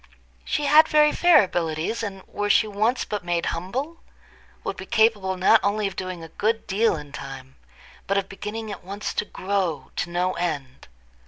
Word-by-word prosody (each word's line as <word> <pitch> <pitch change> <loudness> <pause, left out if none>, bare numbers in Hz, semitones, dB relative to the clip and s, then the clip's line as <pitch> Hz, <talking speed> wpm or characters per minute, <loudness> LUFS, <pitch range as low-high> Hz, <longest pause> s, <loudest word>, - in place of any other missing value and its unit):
She 295 - -1
had 300 +3 +7
very 300 0 +5
fair 350 -8 +6
abilities, 170 +3 -2
and 195 -3 -5
were 205 0 -3
she 220 +2 +5
once 215 +5 0
but 210 -3 -4
made 175 -1 -1
humble, 260 - -4 0.6
would 195 - -3
be 190 - -9
capable 215 -5 +2
not 195 +4 +5
only 205 +1 0
of 195 -1 -3
doing 185 -3 -5
a - - -8
good 225 +1 +1
deal 215 +2 +2
in 145 -2 -9
time, 135 -1 -9 0.5
but 200 - +1
of 195 -1 0
beginning 210 +3 -6
at 200 - -8
once 200 +3 -5
to - - -1
grow 185 -9 -2
to 175 - -1
no 180 +2 0
end. 145 -7 -4
195 Hz, 180 wpm, -24 LUFS, 175-220 Hz, 0.6 s, had